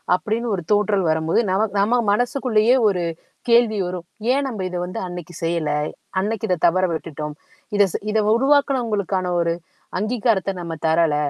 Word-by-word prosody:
அப்படின்னு 215 +6 -2
ஒரு 180 - -4
தோற்றல் 205 -1 +2
வரும்போது 160 +3 +1
நம 195 +4 +2 0.2
நம்ம 225 +5 +3 0.2
மனசுக்குள்ளேயே 245 0 +2
ஒரு 190 -4 +1 0.5
கேள்வி 235 -2 +4
வரும். 180 -1 -5 0.3
ஏன் 275 +2 +1
நம்ப 225 -7 -5
இத 180 - -4
வந்து 180 - -5
அன்னைக்கு 175 -1 -8
செய்யல? 165 -2 0 0.5
அன்னைக்கு 210 +2 -1
இத 180 - +3
தவற 185 +2 +2
விட்டுட்டோம். 150 -2 -5 0.4
இத 205 - +6
செ - - 0
இத 220 - +2 0.2
உருவாக்குனவங்களுக்கான 235 -9 +1
ஒரு 170 0 +1 0.5
அங்கீகாரத்த 215 -3 +1
நம்ம 170 -2 -5
தரல. 160 -1 +3
200 Hz, 150 wpm, -21 LUFS, 175-230 Hz, 0.5 s, இத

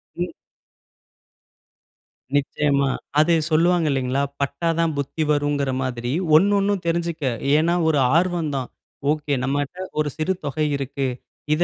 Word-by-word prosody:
ம். 175 +1 -1 2.1
நிச்சயமா. 140 -1 +1 0.3
அது 160 +3 +4 0.2
சொல்லுவாங்க 170 +1 +3
இல்லைங்களா? 135 +1 0 0.2
பட்டா 140 +4 -1
தான் 165 -2 +2
புத்தி 145 +3 -2
வருங்கிற 145 -2 +1
மாதிரி, 120 -1 -3 0.2
ஒண்ணு 200 +6 +5
ஒண்ணும் 200 -1 0
தெரிஞ்சுக்க. 170 -2 -1 0.3
ஏன்னா, 165 +3 +2
ஒரு 150 -3 +3 0.2
ஆர்வம் 170 -3 +1
தான். 130 -2 -3 0.4
ஓகே, 150 -1 -1
நம்மகிட்ட 145 +5 -2 0.2
ஒரு 150 - +1
சிறு 155 +4 0
தொகை 145 +2 -1
இருக்கு. 140 0 -2 0.5
இத 160 +3 +2
150 Hz, 125 wpm, -22 LUFS, 140-170 Hz, 2.1 s, ஒண்ணு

